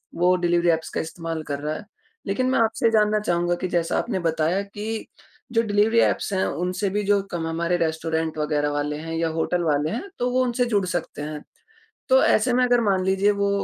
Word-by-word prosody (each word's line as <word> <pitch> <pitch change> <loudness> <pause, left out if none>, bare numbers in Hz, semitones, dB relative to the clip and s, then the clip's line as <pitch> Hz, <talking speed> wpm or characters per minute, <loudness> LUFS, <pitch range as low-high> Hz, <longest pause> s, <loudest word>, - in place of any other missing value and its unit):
वो 180 +1 +3
delivery 175 -1 +2
apps 160 -1 0
का - - -2
इस्तेमाल 165 -1 -5
कर 145 -2 -4
रहा 150 +1 -3
है। 210 - -8 0.4
लेकिन 255 +6 0
मैं 260 - +2
आपसे 225 +1 +1
ये 230 - +5
जानना 215 -1 +3
चाहूँगा 175 -3 0
कि 185 - -1
जैसा 170 -1 0
आपने 210 -6 -2
बताया 165 +2 0
कि 210 +2 -5 0.5
जो 230 - +4
डिलिवरी 215 +1 +2
ऐप्स - - +1
हैं, 190 - +1
उनसे 180 +3 -2
भी 205 +2 -1
जो 200 -1 +3
कम 165 -2 -3
हमारे 170 +2 0
रेस्टोरेंट 160 -1 -1
वग़ैरह 150 -1 0
वाले 145 0 -2
हैं 165 +1 -6
या 165 0 0
होटल 165 +2 -1
वाले 150 -1 +1
हैं, 230 - -3 0.2
तो 245 - +1
वो 255 +1 +2
उनसे 245 0 0
जुड़ 205 -5 +1
सकते 175 -4 -4
हैं। 150 0 -6 0.7
तो 260 0 +6
ऐसे 240 +3 +3
में 250 +1 +3
अगर 245 -1 +3
मान 195 -4 +1
लीजिए 195 +2 +3
वो 200 0 0
180 Hz, 215 wpm, -23 LUFS, 165-210 Hz, 0.7 s, तो